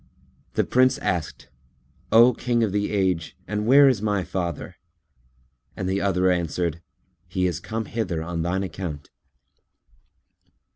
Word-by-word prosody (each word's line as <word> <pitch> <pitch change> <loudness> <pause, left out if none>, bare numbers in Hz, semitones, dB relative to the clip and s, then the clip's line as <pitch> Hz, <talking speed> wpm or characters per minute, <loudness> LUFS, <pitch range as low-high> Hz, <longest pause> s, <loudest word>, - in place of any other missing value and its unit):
The - - +3
Prince 130 +1 +3
asked 85 -4 -3 0.6
"O 120 +3 +7
King 120 0 0
of 105 - 0
the 105 +1 -1
Age, 95 -5 -1
and 105 +2 -2
where 140 +3 +7
is 125 -7 +2
my 105 -3 0
father?" 90 0 -4 1.0
and 95 - -3
the 95 +1 0
other 95 -1 +2
answered, 85 -1 -1 0.5
"He 90 0 -1
is 90 -3 -1
come 110 0 -4
hither 95 -9 -3
on 85 0 -3
thine 90 +3 -1
account." 80 -5 -6
95 Hz, 135 wpm, -24 LUFS, 85-110 Hz, 1.0 s, O